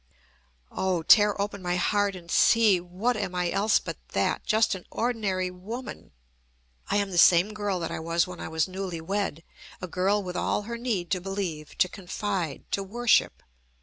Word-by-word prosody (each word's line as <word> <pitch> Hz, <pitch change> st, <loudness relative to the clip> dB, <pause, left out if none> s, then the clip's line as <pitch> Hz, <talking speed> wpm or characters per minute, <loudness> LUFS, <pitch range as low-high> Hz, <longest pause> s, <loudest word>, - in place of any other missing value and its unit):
Oh, 185 Hz, -3 st, -1 dB
tear 205 Hz, +4 st, +5 dB
open 200 Hz, 0 st, -3 dB
my 175 Hz, -1 st, -1 dB
heart 205 Hz, +2 st, +1 dB
and 170 Hz, -2 st, -10 dB
see! 220 Hz, -5 st, +5 dB
What 185 Hz, +8 st, -2 dB
am 195 Hz, -4 st, -3 dB
I 180 Hz, -1 st, 0 dB
else 205 Hz, +2 st, +3 dB
but -, -, -5 dB, 0.2 s
that, -, -, 0 dB
just 220 Hz, 0 st, +2 dB
an 185 Hz, -2 st, -8 dB
ordinary 200 Hz, -6 st, -1 dB
woman? 220 Hz, +8 st, -8 dB, 0.8 s
I -, -, +1 dB
am 200 Hz, -1 st, -1 dB
the 175 Hz, -, +1 dB
same 180 Hz, +5 st, +6 dB
girl 205 Hz, -3 st, -2 dB
that 165 Hz, -, -3 dB
I -, -, -4 dB
was 165 Hz, +1 st, +1 dB
when 180 Hz, -1 st, -9 dB
I -, -, -5 dB
was 160 Hz, -1 st, 0 dB
newly 185 Hz, -2 st, -5 dB
wed, 175 Hz, -2 st, -3 dB, 0.4 s
a 185 Hz, -, -5 dB
girl 195 Hz, +4 st, +1 dB
with 180 Hz, -1 st, -6 dB
all -, -, 0 dB
her 235 Hz, +2 st, -6 dB
need 210 Hz, -8 st, -2 dB
to 185 Hz, -3 st, 0 dB
believe, 185 Hz, -5 st, -5 dB
to 180 Hz, -, +4 dB
confide, 185 Hz, -4 st, -4 dB
to 200 Hz, -, 0 dB
worship. 235 Hz, +5 st, +1 dB
190 Hz, 180 wpm, -27 LUFS, 180-205 Hz, 0.8 s, same